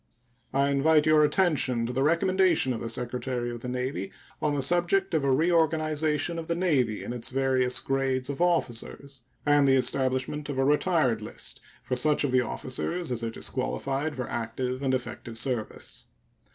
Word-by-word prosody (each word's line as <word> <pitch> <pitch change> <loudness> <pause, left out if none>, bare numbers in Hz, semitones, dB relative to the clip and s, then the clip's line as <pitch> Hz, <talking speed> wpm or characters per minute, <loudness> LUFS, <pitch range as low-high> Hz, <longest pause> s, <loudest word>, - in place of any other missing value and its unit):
I 140 +1 +2
invite 150 +2 +3
your 155 -1 +5
attention 150 -7 +2
to 125 - -4
the 130 - 0
recommendation 170 -2 +2
of 115 - -4
the 115 - -5
Secretary 120 +1 -3
of 120 - -6
the 125 - -7
Navy 125 -6 -3 0.3
on 150 -1 +1
the 140 - -1
subject 175 +5 +2
of 155 -3 +1
a 140 - +1
reorganization 155 0 +1
of 160 - -7
the 170 - 0
Navy 140 - +1
in - - -5
its 120 -2 -3
various 130 -1 +1
grades 135 -1 -1
of 140 +3 -4
officers, 140 -5 -1 0.2
and 145 -1 +4
the 135 - +5
establishing 130 +2 +2
of 140 - -3
a 135 - +2
retired 145 -6 +2
list 105 - -7 0.2
for 125 - -2
such 150 +4 +2
of 140 - 0
the 130 0 +4
officers 130 +6 -3
as 120 -1 -2
are 115 - -1
disqualified 135 +5 -3
for 125 -2 -4
active 125 +3 -3
and 130 -1 +1
effective 120 -2 -6
service. 115 -2 -3
135 Hz, 175 wpm, -27 LUFS, 125-155 Hz, 0.3 s, your